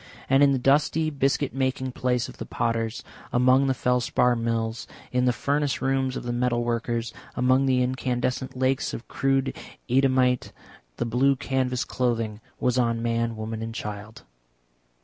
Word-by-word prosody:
And 135 +1 +4
in 140 -1 +6
the 135 - +2
dusty 150 +4 +2
biscuit 140 0 0
making 130 0 -1
place 125 -1 0
of - - -12
the - - -6
potters, 115 -1 -2 0.3
among 130 +2 +4
the 135 - +1
felspar 125 0 +2
mills, 115 -1 -2 0.2
in 125 0 +1
the 125 - +4
furnace 145 +3 0
rooms 130 0 0
of - - -6
the 120 0 -3
metal 120 -1 +1
workers, 115 -1 -2 0.2
among 130 +2 +3
the 130 -1 +3
incandescent 125 0 -2
lakes 130 +1 0
of 115 - -9
crude 135 0 0 0.3
Eadhamite, 130 -1 +2 0.4
the - - -1
blue 130 +4 +3
canvas 130 -1 -1
clothing 115 -4 -1 0.2
was 125 0 +1
on 115 -1 +1
man, 115 0 0
woman 110 0 -5
and 115 0 -5
child. 105 +1 -7
125 Hz, 155 wpm, -25 LUFS, 115-130 Hz, 0.4 s, in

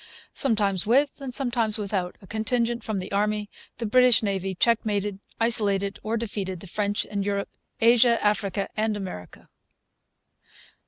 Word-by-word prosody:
Sometimes 205 -7 +1
with, 275 +5 +2
and 270 -2 -5
sometimes 240 -4 +1
without, 195 -4 -2
a - - -11
contingent 235 +3 -1
from 215 -2 -3
the 185 - -5
Army, 210 +1 -1 0.3
the 230 - -3
British 250 +1 +5
Navy 195 -2 -2
checkmated, 210 -2 +1 0.2
isolated, 200 -4 +1
or 225 +2 -2
defeated 200 -5 -4
the 195 - -10
French 205 +2 -1
in 205 -1 -3
Europe, 200 0 -2 0.3
Asia, 235 +1 +5
Africa, 200 -1 0
and 215 -1 0
America. 135 - -8
210 Hz, 140 wpm, -25 LUFS, 200-230 Hz, 0.3 s, British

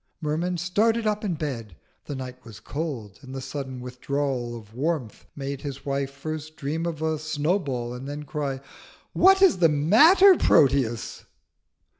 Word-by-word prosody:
Merman 170 +3 -1
started 220 +7 +1
up 210 0 0
in 190 -5 -1
bed. 120 - -5 0.3
The 145 - -5
night 130 -1 -8
was 110 -5 -11
cold, 130 - -5
and 130 0 -9
the - - -3
sudden 130 -1 -6
withdrawal 125 -1 -3
of 110 -1 -14
warmth 140 -3 -3
made 140 -1 -5
his 140 -2 -7
wife 140 -1 -1
first 155 +2 -6
dream 155 +3 -2
of 160 -2 -4
a 160 -1 0
snowball, 145 -5 -1
and 125 +2 -7
then 145 +1 -5
cry 145 -4 -3 0.5
"What 385 +1 +6
is 360 - +5
the 165 -2 +5
matter, 295 - +6
Proteus?" 130 -5 +2
145 Hz, 155 wpm, -25 LUFS, 130-165 Hz, 0.5 s, What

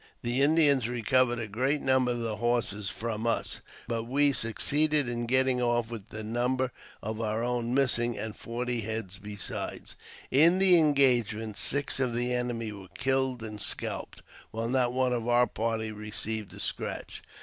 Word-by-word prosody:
The 120 +3 0
Indians 140 -5 +5
recovered 120 +1 +2
a 115 - -3
great 130 +8 0
number 130 -2 +2
of 120 -1 -2
the 110 -2 -3
horses 115 -4 -1
from 115 0 -4
us, 115 - -2 0.3
but 115 -1 -3
we 140 +3 +3
succeeded 145 +6 +1
in 120 -1 -3
getting 130 0 +4
off 120 -1 0
with 110 -3 -8
the 110 0 -7
number 125 +3 -1 0.3
of 110 +1 -4
our 110 +1 -2
own 120 0 -1
missing, 120 -4 +1
and 110 -1 -5
forty 120 0 -3
head 110 -3 -4
besides. 105 -2 -5 0.4
In 165 +7 +6
the 190 -2 +8
engagement, 120 -8 +2
six 140 +4 -1
of 125 -3 0
the 120 +1 0
enemy 120 -3 -2
were 100 -2 -11
killed 130 -2 0
and 105 -1 -7
scalped, - - -4 0.3
while 115 +1 -4
not 125 -1 +1
one 130 0 0
of 120 -1 -3
our 120 0 +4
party 110 -1 -3
received 105 0 -4
a - - -11
scratch. - - -5
120 Hz, 165 wpm, -28 LUFS, 110-130 Hz, 0.4 s, the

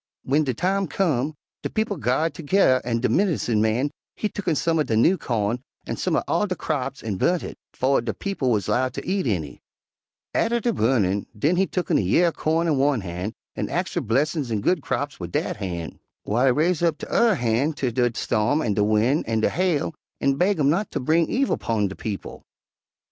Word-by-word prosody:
"W'en 145 +4 +2
de 135 - 0
time 195 +6 0
come, 150 -5 0 0.3
de - - -3
people 220 -1 -1
ga'rred 155 +2 0
toge'rr 150 -5 +3
an' 115 -1 -1
de - - +2
medincin' 155 - +1
man 115 +6 +1 0.2
he 210 - -2
tucken 180 -8 -1
some 165 +2 +1
er - - +4
de 110 -6 0
new 165 +12 +5
cawn 115 - -1 0.3
an' - - -3
some - - 0
uv - - +1
all - - +1
de - - -2
craps - - -3
an' 105 -4 -3
burnt 175 - +1
hit, - - -6 0.2
befo' 135 0 +1
de 115 -1 -2
people 195 - -2
wuz 110 -4 +2
'lowed 130 +1 0
ter - - -3
eat 190 -4 0
any. 80 -10 -2 0.7
Atter 235 +1 +1
de 235 +1 0
burnin', 105 - +1
den 150 +11 +2
he 190 +2 +2
tucken 180 - 0
a - - +2
year 125 - +3
er - - -5
cawn 160 +1 0
in 150 -5 +1
one 140 -4 +2
han' 90 +3 -5 0.2
an' - - -3
ax - - -1
fer - - 0
blessin's 140 +4 0
an' 105 -2 0
good 180 - +1
craps 145 0 -3
wid 85 -2 -6
dat - - -1
han', 85 -5 -5 0.3
w'ile 120 +5 +2
he 130 - +5
raise 160 +6 +1
up 165 -3 +2
tu'rr 230 -4 +2
han' 120 +4 +1
ter 135 -3 -2
de 120 0 +1
storm 115 +7 +1
an' 105 - 0
de 105 - +2
win' 110 +8 +2
an' 110 -1 0
de - - +2
hail 175 -3 0 0.3
an' 140 - +2
baig 190 +7 +2
'em 145 -1 +4
not 195 +6 0
ter - - -3
bring 160 +5 +2
evil 270 +2 +1
'pun 110 -3 0
de 95 - -7
people. 105 -3 -6
135 Hz, 220 wpm, -24 LUFS, 110-170 Hz, 0.7 s, new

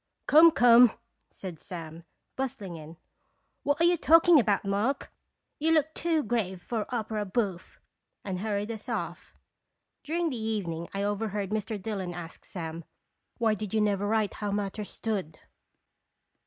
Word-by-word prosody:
"Come, 320 +3 +8
come," 245 -5 +7 0.4
said 180 -5 -8
Sam, 165 -1 -8 0.3
bustling 225 -9 -4
in, 160 +1 -10 0.6
"what 285 +2 0
are - - +3
you 345 +1 +4
talking 330 0 +6
about, 210 -4 +1
Mark? 210 +8 -1 0.5
You 320 +2 +2
look 315 0 +2
too 325 -2 0
grave 210 -5 -1
for 215 +3 -3
opera 220 -3 -2
bouffe," 195 -3 -3 0.5
and 190 -2 -3
hurried 210 +1 -2
us 225 +3 -8
off. 175 -7 -5 0.7
During 330 +1 -1
the 240 -4 -4
evening 175 -7 -3
I 195 0 -2
overheard 205 -1 -2
Mr. 215 0 -2
Dillon 190 -4 -4
ask 170 -1 -9
Sam, 165 -2 -6 0.5
"Why 225 -2 +2
did 215 0 -4
you - - +3
never 205 -1 +1
write 215 -1 +1
how 210 - -4
matters 205 0 -3
stood?" 195 -8 -4
210 Hz, 145 wpm, -28 LUFS, 190-240 Hz, 0.7 s, Come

